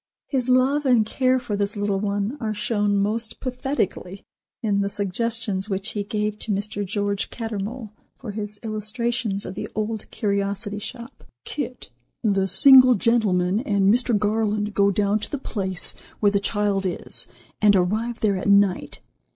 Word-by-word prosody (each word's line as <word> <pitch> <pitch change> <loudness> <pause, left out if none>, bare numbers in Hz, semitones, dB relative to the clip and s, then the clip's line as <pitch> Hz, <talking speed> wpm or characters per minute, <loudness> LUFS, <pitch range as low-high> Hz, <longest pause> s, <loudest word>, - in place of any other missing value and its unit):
His 260 -3 -1
love 260 +3 +3
and 245 -5 +4
care 255 +3 +1
for 240 -5 -3
this 205 +1 -2
little 205 -1 0
one 205 +4 -1
are 215 -3 -2
shown 205 -1 0
most 220 +3 -1
pathetically 250 -7 -3 0.4
in 200 -2 +1
the 200 - -1
suggestions 205 0 -2
which 195 +1 -2
he 210 -2 -3
gave 210 +1 -2
to 220 - -4
Mr. 205 +1 -2
George 200 +1 -2
Cattermole 225 0 -5 0.3
for 240 -5 -7
his 210 0 -5
illustrations 215 -1 -2
of - - -6
the 190 - -6
"Old 215 0 -3
Curiosity 200 0 -2
Shop." 235 +4 -9 0.2
"Kit, 255 - -5 0.3
the 195 -3 +2
single 255 +6 +8
gentleman, 200 -4 +2
and 200 -6 +2
Mr. 240 -2 +2
Garland 210 0 0
go 200 0 +3
down 200 +1 +1
to 210 - -4
the 290 - -3
place 190 -8 0 0.3
where 205 -2 +3
the 200 - +2
child 200 -1 0
is 180 - 0 0.3
and 210 -1 +6
arrive 215 +6 0
there 205 -3 +2
at 185 - -2
night. 200 -2 +2
210 Hz, 160 wpm, -23 LUFS, 200-230 Hz, 0.4 s, single